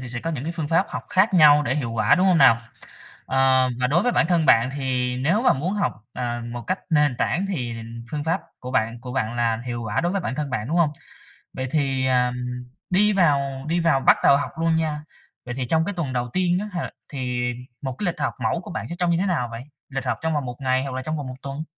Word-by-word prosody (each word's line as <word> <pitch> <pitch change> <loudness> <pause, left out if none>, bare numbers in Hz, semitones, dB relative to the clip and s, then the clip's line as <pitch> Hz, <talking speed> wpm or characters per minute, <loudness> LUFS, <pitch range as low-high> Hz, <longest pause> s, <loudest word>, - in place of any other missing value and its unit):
thì 130 - -7
sẽ 120 0 -5
có 165 - -3
những 155 +2 -4
phương 160 -3 -4
pháp 165 +4 +3
học - - -5
khác 190 +1 +3
nhau 150 -3 +7
để - - 0
hiệu 125 -6 -2
quả, 115 - +4
đúng 185 +1 +2
hông 180 -3 +4
nào? 135 -5 +7 0.7
Ờ, 130 -1 +3
và 125 - +3
đối 165 +8 +2
với 245 - +1
bản - - +3
thân 170 -2 +2
bạn, 115 +2 +5
thì 125 -2 -1
nếu 170 - +1
mà 255 - +5
muốn 160 +8 -2
học, 205 - 0 0.2
ờ, 120 -1 -3
một 120 -1 -5
cách 185 +1 0
nền 150 -5 +3
tảng 190 +3 0
thì 125 -11 -3 0.4
phương 150 -1 -3
pháp 165 - 0 0.2
của 125 - -7
bạn 115 -2 0
của 125 0 -7
bạn 115 -3 -1
là 115 -1 +1
hiệu 120 -1 -3
quả 105 -2 -1
đối 175 +2 0
với 195 - 0
bản 155 - -3
thân 145 0 -3
bạn, 115 -1 -3
đúng 165 - 0
không? 170 -4 +3 0.6
Vậy 130 0 -3
thì, 135 -3 +1
ờm, 125 -1 +2 0.5
đi 210 +3 +3
vào 140 -7 +1
đi 170 +2 +1
vào 165 -5 +3
bắt - - +6
đầu 140 - +6
học 145 - -3
luôn 165 0 +2
nha, 155 -2 -1 0.4
vậy 120 0 -5
thì 130 - -1
trong 160 +6 +1
cái 205 - -3
tuần 155 -7 -3
đầu 120 -1 -2
tiên 180 -1 +2
á 210 +1 -5
h 175 - -2 0.2
thì 125 -3 -2 0.3
một 130 -2 -4
cái 205 - -3
lịch 170 -3 -2
học 145 - -1
mẫu 170 - 0
của - - -9
bạn - - -4
sẽ 170 - -5
trông 175 - +1
như 165 - +2
thế 185 - 0
nào 165 -11 0
vậy? 115 +1 -6 0.3
Lịch 135 -1 -4
học 125 - 0
trong 160 0 0
vòng 145 -3 -1
1 125 -1 -5
ngày 130 -1 +1
hoặc 135 -2 -5
là 130 - -3
trong 155 +4 -3
vòng 145 - -5
1 130 - -7
tuần? 140 +2 -5
140 Hz, 265 wpm, -23 LUFS, 125-165 Hz, 0.7 s, nhau